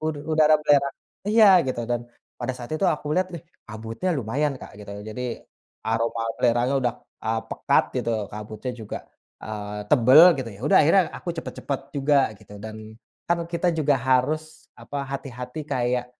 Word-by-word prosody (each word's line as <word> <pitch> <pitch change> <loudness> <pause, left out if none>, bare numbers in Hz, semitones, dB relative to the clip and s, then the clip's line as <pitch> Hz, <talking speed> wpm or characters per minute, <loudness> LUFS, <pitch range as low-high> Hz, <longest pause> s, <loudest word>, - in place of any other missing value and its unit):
Udu 155 -1 -2
udara 155 0 +5
belerang 140 -2 +3 0.3
iya 220 +1 +6 0.2
gitu, 130 -2 -2
dan 120 - +1 0.4
pada 125 +1 -1
saat 120 +3 -8
itu 155 +5 +1
aku 150 -1 -2
lihat, 185 0 +1
ih - - -10 0.3
kabutnya 115 +11 -4
lumayan 140 +6 0
Kak, - - -10
gitu, 100 - -10
jadi 110 +3 -6 0.6
aroma 115 +1 0
belerangnya 120 +2 +2
udah, 120 -2 0 0.3
eee, 110 0 0
pekat - - +2
gitu, - - -1 0.2
kabutnya 105 +4 -6
juga, 110 - -5 0.5
eee, 105 -1 -5
tebal 130 +6 +7 0.2
gitu. 125 -3 -3
Ya - - -16
udah - - +6
akhirnya 165 +6 +5
aku - - -9
cepat-cepat 140 -3 -4 0.2
juga 140 +1 +3 0.2
gitu, 105 - -14
dan 110 0 -7 0.5
kan 170 0 +2
kita 175 +1 +1
juga 145 -2 +3
harus 155 +4 +1 0.2
apa, 145 - -6
hati-hati 125 +1 -6
kayak 125 0 0
130 Hz, 160 wpm, -24 LUFS, 115-150 Hz, 0.6 s, tebal